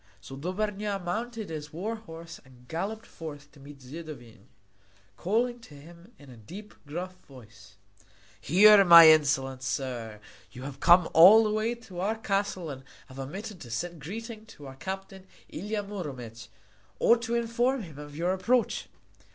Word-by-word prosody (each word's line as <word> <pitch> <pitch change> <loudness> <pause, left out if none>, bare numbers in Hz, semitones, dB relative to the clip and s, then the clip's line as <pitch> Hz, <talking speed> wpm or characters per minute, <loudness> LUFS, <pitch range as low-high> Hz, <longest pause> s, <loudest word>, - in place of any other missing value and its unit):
So 100 +7 -10
Dobrnja 200 +6 -3
mounted 215 +3 -5
his 150 -1 -6
war 200 +8 -4
horse 165 -6 -11
and 125 -1 -20
galloped 200 - -4
forth 145 -3 -10
to 140 - -19
meet 140 0 -13
Zidovin, 130 -7 -11 0.7
calling 240 - -1
to 155 -10 -15
him 170 +7 -15
in 140 -3 -15
a 120 - -13
deep, 190 - -11
gruff 180 +5 -5
voice: 110 -6 -16 0.7
"Here, 200 +6 +7
my 170 -3 +10
insolent 135 -4 +2
sir, 125 -5 -4 0.3
you 125 0 -10
have 135 0 -8
come 175 +1 +6
all 195 +8 +9
the 215 - 0
way 215 +2 -1
to 200 -7 -11
our 205 +4 0
castle 195 -6 -2
and 135 -1 -9 0.3
have 130 +1 -11
omitted 190 +8 -7
to 120 - -10
send 170 +6 -5
greeting 220 - -8
to 145 - -13
our 135 -1 -10
captain 190 +4 -7 0.2
Ilia 205 +4 -4
Muromec, 130 - -8 0.5
or 235 - +5
to 235 0 -3
inform 235 +2 0
him 155 -5 -11
of 145 0 -10
your 175 +4 0
approach." 230 +6 0
170 Hz, 160 wpm, -28 LUFS, 140-210 Hz, 0.7 s, my